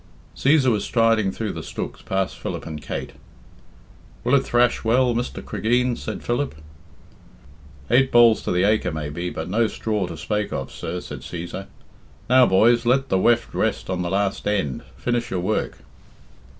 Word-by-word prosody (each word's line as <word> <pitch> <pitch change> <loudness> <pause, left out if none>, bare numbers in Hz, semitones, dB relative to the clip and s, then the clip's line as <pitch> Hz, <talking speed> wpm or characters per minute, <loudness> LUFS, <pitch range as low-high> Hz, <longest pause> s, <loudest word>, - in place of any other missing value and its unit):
Cæsar 140 -2 +3
was 105 -2 0
striding 115 -4 +2
through 110 0 -3
the - - -6
stooks - - -6
past 95 -1 -2
Philip - - -5
and 75 -2 -6
Kate. - - -5 1.1
"Will 125 - +1
it 140 - +7
thrash 120 -2 +2
well, 120 +2 +3
Mr. 120 +2 -3
Cregeen?" 125 +2 +1
said 110 -3 -6
Philip. 120 - -1 1.4
"Eight 130 +2 +4
bolls 120 -2 +6
to - - -1
the 90 +1 +2
acre 105 +2 +2
maybe, 80 +3 -4
but 80 - -5
no 110 +5 +2
straw 105 -2 -2
to 85 - -7
spake 105 +5 -2
of, - - -4
sir," - - -5
said - - -8
Cæsar. 90 +3 -7 0.6
"Now, 130 0 +6
boys, 115 +5 +4
let 135 +3 +2
the 95 - +2
weft 120 +3 +2
rest - - -1
on 90 -1 -1
the 85 - -2
last 100 +1 -1
end, 95 -11 -1 0.2
finish 120 -1 -1
your 95 - -2
work." 90 - -1
110 Hz, 165 wpm, -23 LUFS, 95-120 Hz, 1.4 s, it